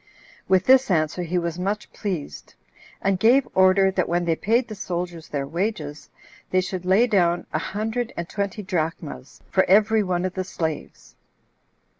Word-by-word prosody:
With 190 -1 +3
this 260 -1 +5
answer 160 -1 +1
he 175 +1 -2
was 170 0 -2
much 200 +3 -3
pleased; 180 -8 -5 0.5
and 195 -1 +1
gave 250 +6 +4
order, 190 +1 +5
that 185 -2 -1
when 175 +1 0
they 165 -1 +2
paid 230 +8 +1
the 215 - -7
soldiers 175 -4 -5
their 140 -2 -2
wages, 160 -2 -4 0.4
they 185 - +2
should 185 -1 -4
lay 190 +6 +4
down 175 -6 +2
[a - - +1
hundred 220 +4 -3
and] 170 - -3
twenty 200 +2 -3
drachmas 165 - -4
4 - - -35
for - - -6
every 215 +3 +5
one 180 -2 -1
of 185 - -2
the 185 - -2
slaves? 160 -4 -5
185 Hz, 170 wpm, -23 LUFS, 170-205 Hz, 0.5 s, this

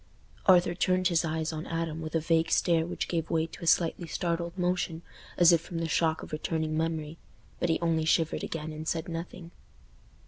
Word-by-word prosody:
Arthur 180 -2 +6
turned 185 +1 +2
his 170 -1 +2
eyes 160 0 -2
on 155 +1 -5
Adam 165 -1 -3
with 155 0 -5
a - - +4
vague 165 +1 +1
stare 165 -2 +2
which 175 - -3
gave 165 -2 -2
way 160 -1 +1
to 165 - -11
a - - -4
slightly 170 +1 +2
startled 170 +1 -2
motion 180 -2 -1 0.3
as 175 0 +7
if 170 -2 +4
from 170 -1 -7
the 165 0 -1
shock 160 0 +1
of - - -10
returning 155 0 -2
memory. 160 0 -2 0.4
But 175 - 0
he 160 - +2
only 165 -2 +1
shivered 160 0 +1
again 160 -1 -4
and 155 +1 -7
said 165 0 -1
nothing. 165 0 -7
165 Hz, 200 wpm, -29 LUFS, 160-170 Hz, 0.4 s, as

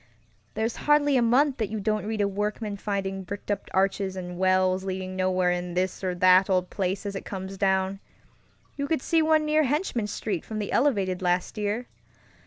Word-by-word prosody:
There's 220 +2 -1
hardly 295 -1 +3
a 250 - +4
month 260 +4 +3
that 220 -4 -1
you 220 0 -3
don't 215 0 -1
read 220 -1 -1
of 200 0 +1
workmen 210 0 -2
finding 195 -1 -3
bricked 200 +2 -6
up 200 - -3
arches 190 0 0
and 180 -1 -6
wells 185 0 +2
leading 185 -1 -4
nowhere 185 -1 +1
in 180 0 -3
this 185 +1 -1
or 185 -1 -1
that 185 +2 +5
old 185 -1 +1
place 190 +1 -2
as 200 -1 -4
it 195 - -5
comes 190 0 -6
downŌĆöyou 190 0 +1 0.9
could 315 -4 0
see 330 -1 +3
one 310 -1 +3
near 305 +1 +3
Henchman 285 - 0
Street 205 -4 -3
from 220 - -6
the 210 -1 -3
elevated 195 -10 +1
last 180 0 0
year. 210 +3 -2
195 Hz, 190 wpm, -26 LUFS, 185-220 Hz, 0.9 s, that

